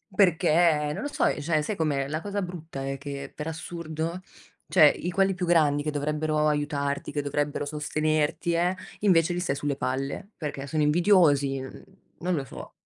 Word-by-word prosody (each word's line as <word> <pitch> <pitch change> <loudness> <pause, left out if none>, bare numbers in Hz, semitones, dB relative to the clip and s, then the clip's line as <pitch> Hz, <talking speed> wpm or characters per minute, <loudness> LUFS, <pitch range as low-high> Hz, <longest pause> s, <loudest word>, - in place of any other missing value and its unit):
Perché, 165 -5 +3
non - - -4
lo 290 - -2
so, - - 0 0.2
cioè 155 0 +1
sai 205 +8 -3
com'è, 145 -5 0
la 155 +3 -3
cosa 205 +1 -3
brutta 165 -6 -6
è 135 0 -3
che 140 0 -6
per 150 - -5
assurdo, 165 +1 -4 0.5
cioè 155 - +7
i 175 - -4
quelli 195 +2 +2
più 180 0 -3
grandi 150 -4 +3
che 150 - -1
dovrebbero 150 +1 0
aiutarti, 145 -1 -1
che 145 0 -1
dovrebbero 145 +1 -2
sostenerti 155 +2 0
eh, 175 +2 +2 0.3
invece 175 -4 +4
gli 175 - -2
stai 175 - -1
sulle 145 -1 -1
palle, 135 +7 -3
perché 145 -3 -5
sono 155 +2 -1
invidiosi, 150 -4 +4
n 130 0 -9 0.4
non 180 +1 0
lo 140 -3 -2
so. - - -10
155 Hz, 175 wpm, -26 LUFS, 145-170 Hz, 0.5 s, cioè